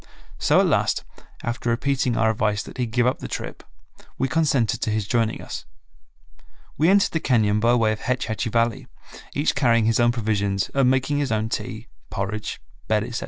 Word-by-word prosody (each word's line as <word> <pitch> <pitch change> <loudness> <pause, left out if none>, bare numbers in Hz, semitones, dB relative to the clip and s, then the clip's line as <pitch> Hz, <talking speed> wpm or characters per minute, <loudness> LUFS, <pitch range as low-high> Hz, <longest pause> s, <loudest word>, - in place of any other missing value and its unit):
So - - +4
at - - +4
last, - - +1 0.4
after 120 0 -2
repeating 130 0 0
our 110 0 +3
advice 105 -1 0
that - - -11
he 125 - 0
give 120 +2 +1
up 125 - +1
the - - -6
trip, - - -6 0.6
we 135 - +1
consented 140 -6 +1
to - - 0
his 105 -2 -1
joining 115 -2 0
us. - - -7 1.1
We 160 +3 +3
entered 200 +1 +4
the 160 - 0
cañon 110 -7 +2
by 120 +3 +3
way 110 -2 +3
of 110 - -3
Hetch 125 -1 -1
Hetchy 110 0 -2
Valley, 115 0 0 0.5
each 145 +2 +1
carrying 120 -5 +3
his 115 +1 +2
own 120 0 +4
provisions, 100 -4 -1
and 135 -2 +3
making 135 +2 +1
his 140 -4 -1
own 110 0 0
tea, 115 -1 -4 0.2
porridge, 100 +2 -4 0.3
bed, 105 -1 +2
etc. 120 +1 -4
115 Hz, 190 wpm, -23 LUFS, 110-130 Hz, 1.1 s, So